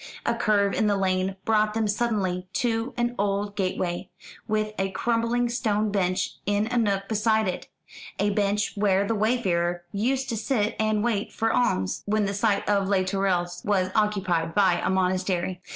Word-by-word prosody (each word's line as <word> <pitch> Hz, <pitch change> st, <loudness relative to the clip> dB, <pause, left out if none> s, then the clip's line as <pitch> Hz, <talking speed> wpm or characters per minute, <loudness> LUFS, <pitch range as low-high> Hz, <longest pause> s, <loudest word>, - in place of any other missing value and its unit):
A 235 Hz, -, +2 dB
curve 210 Hz, -4 st, +2 dB
in 215 Hz, -, +1 dB
the 205 Hz, -1 st, +2 dB
lane 190 Hz, 0 st, 0 dB
brought 215 Hz, -1 st, +2 dB
them 225 Hz, -1 st, +1 dB
suddenly 200 Hz, -5 st, -1 dB
to 235 Hz, -2 st, 0 dB
an 240 Hz, 0 st, 0 dB
old 200 Hz, 0 st, -1 dB
gateway, 185 Hz, -2 st, -2 dB, 0.4 s
with 215 Hz, -1 st, -1 dB
a 195 Hz, 0 st, 0 dB
crumbling 235 Hz, +4 st, 0 dB
stone 215 Hz, -3 st, 0 dB
bench 190 Hz, -1 st, -1 dB
in 205 Hz, +1 st, +2 dB
a 245 Hz, -, 0 dB
nook 200 Hz, -3 st, 0 dB
beside 220 Hz, 0 st, +1 dB
it 180 Hz, -, -4 dB, 0.5 s
a 205 Hz, 0 st, +1 dB
bench 205 Hz, 0 st, 0 dB
where 200 Hz, -1 st, +2 dB
the 225 Hz, -, 0 dB
wayfarer 185 Hz, -6 st, 0 dB
used 260 Hz, +6 st, 0 dB
to 230 Hz, -, -2 dB
sit 215 Hz, -1 st, 0 dB
and 215 Hz, -1 st, +1 dB
wait 220 Hz, -4 st, -1 dB
for 225 Hz, 0 st, 0 dB
alms, 95 Hz, -, +1 dB
when 215 Hz, 0 st, +1 dB
the 200 Hz, -, -2 dB
site 200 Hz, 0 st, +1 dB
of 200 Hz, -2 st, +2 dB
Les 195 Hz, -2 st, +2 dB
Tourelles 185 Hz, -2 st, -1 dB
was 190 Hz, -2 st, +1 dB
occupied 185 Hz, -6 st, 0 dB
by 190 Hz, -4 st, +3 dB
a -, -, +1 dB
monastery. 185 Hz, -1 st, 0 dB
205 Hz, 170 wpm, -25 LUFS, 190-220 Hz, 0.5 s, by